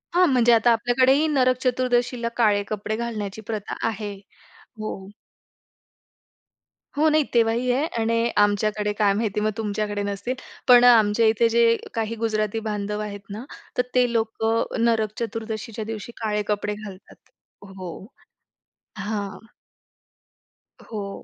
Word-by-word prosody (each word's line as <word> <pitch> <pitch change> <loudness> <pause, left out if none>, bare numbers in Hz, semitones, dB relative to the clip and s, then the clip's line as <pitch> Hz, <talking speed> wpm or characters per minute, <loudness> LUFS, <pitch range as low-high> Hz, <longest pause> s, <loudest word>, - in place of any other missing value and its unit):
हां, 360 0 +5
म्हणजे 240 -2 +4
आता 230 +1 +4
आपल्याकडेही 255 +6 +3
नरक 255 -4 +2
चतुर्दशीला 245 -1 0
काळे 210 -4 +3
कपडे 215 0 -3
घालण्याची 220 -3 -4
प्रथा 210 -2 -4
आहे. 210 -2 -4 0.7
हो. 195 -3 -6 1.9
हो, 305 +2 +3
नाही. 310 0 +3
तेव्हाही 235 +1 +2
आहे 270 +5 +1 0.2
आणि 230 +1 +1
आमच्याकडे 210 0 +2
काय 205 -2 +4
माहिती? 210 0 -1
मग 215 0 +1
तुमच्याकडे 205 -1 -2
नसतील. 200 +5 -3 0.3
पण 245 -1 +8
आमच्या 225 -2 +5
इथे 225 +1 +3
जे 230 0 +4 0.2
काही 225 0 -2
गुजराती 215 -1 0
बांधव 210 0 -3
आहेत 205 -1 -5
ना 210 +4 -6 0.3
तर, - - +5
ते 250 -1 +3
लोकं 225 0 0 0.2
नरक 220 -3 +2
चतुर्दशीच्या 225 -1 -4
दिवशी 220 +1 -6
काळे 210 -1 0
कपडे 210 0 -1
घालतात. 205 -3 -11 0.5
हो, 190 -2 -9 0.9
हां. 205 +1 -5 1.3
हो. 200 -3 -6
220 Hz, 125 wpm, -24 LUFS, 210-235 Hz, 1.9 s, पण